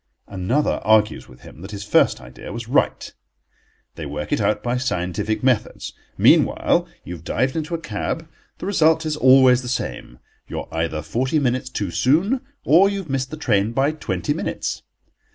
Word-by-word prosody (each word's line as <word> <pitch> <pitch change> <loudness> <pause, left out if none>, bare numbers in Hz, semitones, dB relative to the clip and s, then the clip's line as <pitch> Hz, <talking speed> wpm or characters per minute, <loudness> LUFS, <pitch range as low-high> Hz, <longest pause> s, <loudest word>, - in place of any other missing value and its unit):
Another 100 +10 -1
argues 110 -1 +2
with - - -16
him 80 - -13
that 95 - -8
his 100 -1 -6
first - - +3
idea 60 0 -10
was 115 +2 -6
right. 130 - 0 0.8
They 75 - -7
work 75 +1 -5
it - - +1
out - - 0
by 120 +1 0
scientific 105 -2 -2
methods. 130 -4 0 0.2
Meanwhile - - +3 0.2
you 90 - -7
have 85 -2 -10
dived 130 +9 -1
into 160 +1 -2
a - - -4
cab. 165 -1 -4 0.3
The - - -7
result 160 -4 +3
is 155 -1 -1
always 130 -2 +6
the 125 - -8
same: 120 - -4 0.3
you - - -4
are - - -11
either 80 -2 -2
forty 130 - -1
minutes 130 -2 0
too 100 -7 -3
soon, 180 - +2 0.2
or 180 +6 +6
you 200 - -3
have 180 -8 -6
missed 130 -1 -1
the 155 - -7
train 110 -7 +1
by 135 +4 +2
twenty 95 - -2
minutes. - - -3
125 Hz, 180 wpm, -21 LUFS, 100-150 Hz, 0.8 s, always